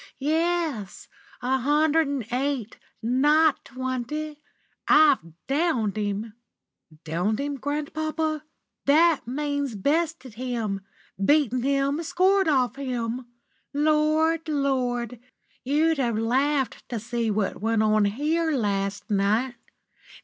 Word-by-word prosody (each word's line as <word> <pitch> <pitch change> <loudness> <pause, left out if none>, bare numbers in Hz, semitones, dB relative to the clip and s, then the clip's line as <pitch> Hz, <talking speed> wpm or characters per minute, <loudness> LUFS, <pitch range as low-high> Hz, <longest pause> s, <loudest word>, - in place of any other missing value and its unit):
Yes. 315 - -1 0.4
A 260 +2 +1
hundred 300 +4 +3
and 275 -5 -2
eight, 260 -3 -2 0.2
not 295 +5 +3
twenty. 260 +4 -4 0.5
I've 300 -2 +6 0.3
downed 270 - 0
him." 210 +1 -3 0.7
"Downed 180 +7 -1
him, 285 0 -2
grandpapa?" 310 +2 -2 0.5
"That 310 -2 +4
means 285 -1 -2
bested 300 - -1
him, 225 -4 -3 0.4
beaten 265 -1 +3
him, 275 +3 +1
scored 375 +3 +2
off 260 -4 +2
him. 245 -2 -3 0.5
Lord! 310 +2 +2
Lord! 250 -5 -1 0.4
You'd 305 +3 +2
have 235 -4 0
laughed 265 +4 0
to 235 - -3
see 235 0 -2
what 205 -3 -1
went 225 0 +2
on 215 -1 +3
here 310 +9 0
last 200 -5 -1
night. 210 +6 +1
270 Hz, 105 wpm, -25 LUFS, 230-305 Hz, 0.7 s, I've